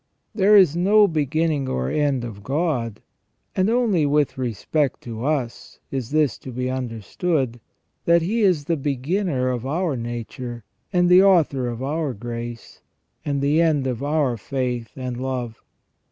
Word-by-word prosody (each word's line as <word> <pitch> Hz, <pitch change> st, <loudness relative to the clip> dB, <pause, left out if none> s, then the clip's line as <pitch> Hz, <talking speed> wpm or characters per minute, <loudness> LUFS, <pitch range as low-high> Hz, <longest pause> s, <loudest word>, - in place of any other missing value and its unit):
There 210 Hz, 0 st, +5 dB
is 180 Hz, -6 st, +5 dB
no 205 Hz, +4 st, +5 dB
beginning 155 Hz, -3 st, 0 dB
or 65 Hz, 0 st, -1 dB
end 140 Hz, -4 st, +1 dB
of 105 Hz, -4 st, -8 dB
God, 130 Hz, -, -2 dB, 0.5 s
and 190 Hz, +2 st, +2 dB
only 225 Hz, -8 st, +2 dB
with 145 Hz, 0 st, +1 dB
respect 130 Hz, +3 st, -1 dB
to 115 Hz, -1 st, -6 dB
us 135 Hz, -5 st, -3 dB
is 130 Hz, -4 st, -3 dB
this 150 Hz, -3 st, +1 dB
to 130 Hz, -, -8 dB
be 125 Hz, +1 st, -2 dB
understood, 130 Hz, -, -2 dB, 0.5 s
that 170 Hz, 0 st, +4 dB
He 220 Hz, +7 st, 0 dB
is 180 Hz, -8 st, +3 dB
the 165 Hz, +1 st, 0 dB
beginner 140 Hz, +1 st, -1 dB
of 120 Hz, -2 st, -3 dB
our 155 Hz, +3 st, -1 dB
nature, 120 Hz, 0 st, -6 dB, 0.3 s
and 175 Hz, -1 st, +3 dB
the 180 Hz, +1 st, +7 dB
author 160 Hz, -10 st, +3 dB
of 120 Hz, +1 st, -4 dB
our 145 Hz, -1 st, -2 dB
grace, 120 Hz, +1 st, -7 dB, 0.4 s
and 140 Hz, -1 st, -1 dB
the 145 Hz, +4 st, +3 dB
end 155 Hz, -5 st, +2 dB
of 125 Hz, -2 st, -2 dB
our 145 Hz, -4 st, +1 dB
faith 125 Hz, 0 st, -3 dB
and 125 Hz, -2 st, -5 dB
love. 125 Hz, -3 st, -4 dB
140 Hz, 155 wpm, -23 LUFS, 120-165 Hz, 0.5 s, the